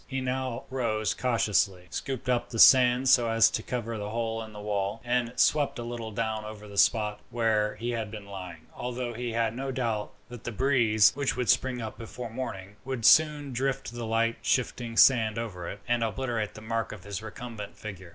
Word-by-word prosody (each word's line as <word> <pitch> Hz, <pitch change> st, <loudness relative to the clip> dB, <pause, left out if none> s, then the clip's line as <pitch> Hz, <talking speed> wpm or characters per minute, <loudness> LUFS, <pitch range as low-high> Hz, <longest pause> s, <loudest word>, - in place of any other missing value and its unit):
He 135 Hz, -1 st, -3 dB
now 130 Hz, -1 st, -2 dB
rose 110 Hz, -5 st, 0 dB
cautiously, 105 Hz, -6 st, +1 dB
scooped 135 Hz, -2 st, -4 dB
up 125 Hz, -1 st, 0 dB
the 115 Hz, -, -6 dB
sand 125 Hz, +1 st, +7 dB
so 120 Hz, -2 st, +5 dB
as 115 Hz, 0 st, +5 dB
to -, -, -2 dB
cover 115 Hz, -2 st, -4 dB
the 105 Hz, 0 st, -4 dB
hole 115 Hz, 0 st, -2 dB
in 110 Hz, -1 st, -8 dB
the 105 Hz, -, -10 dB
wall, 105 Hz, 0 st, -2 dB
and 120 Hz, -1 st, 0 dB
swept 145 Hz, +1 st, +3 dB
a 120 Hz, -, -4 dB
little 120 Hz, -1 st, -5 dB
down 110 Hz, 0 st, -2 dB
over 105 Hz, 0 st, -9 dB
the 100 Hz, -, -11 dB
spot 105 Hz, -2 st, +3 dB
where 110 Hz, -3 st, +1 dB
he 120 Hz, +2 st, -3 dB
had 115 Hz, -3 st, -3 dB
been 105 Hz, -1 st, -8 dB
lying, 90 Hz, -5 st, -9 dB
although 125 Hz, -1 st, -4 dB
he 120 Hz, 0 st, -4 dB
had 115 Hz, -1 st, 0 dB
no 135 Hz, +2 st, -4 dB
doubt 115 Hz, -5 st, -2 dB, 0.2 s
that 120 Hz, -2 st, -10 dB
the 120 Hz, -, -4 dB
breeze, 115 Hz, -4 st, +4 dB
which 140 Hz, -2 st, -1 dB
would 125 Hz, -2 st, -1 dB
spring 125 Hz, -2 st, 0 dB
up 110 Hz, -, -7 dB
before 115 Hz, +1 st, -7 dB
morning, 100 Hz, -5 st, -6 dB
would 130 Hz, -4 st, -3 dB
soon 150 Hz, -3 st, +5 dB
drift 135 Hz, 0 st, -2 dB
the 120 Hz, -1 st, -5 dB
light 115 Hz, +1 st, +1 dB
shifting 120 Hz, -2 st, -1 dB
sand 115 Hz, -5 st, +5 dB
over 95 Hz, -7 st, -5 dB
it, 100 Hz, -, -7 dB
and 120 Hz, -1 st, +1 dB
obliterate 115 Hz, -2 st, -2 dB
the 110 Hz, -, -9 dB
mark 115 Hz, 0 st, -2 dB
of 105 Hz, -4 st, -9 dB
his 100 Hz, 0 st, -5 dB
recumbent 110 Hz, -1 st, -8 dB
figure. 95 Hz, -4 st, -8 dB
115 Hz, 200 wpm, -28 LUFS, 105-125 Hz, 0.2 s, sand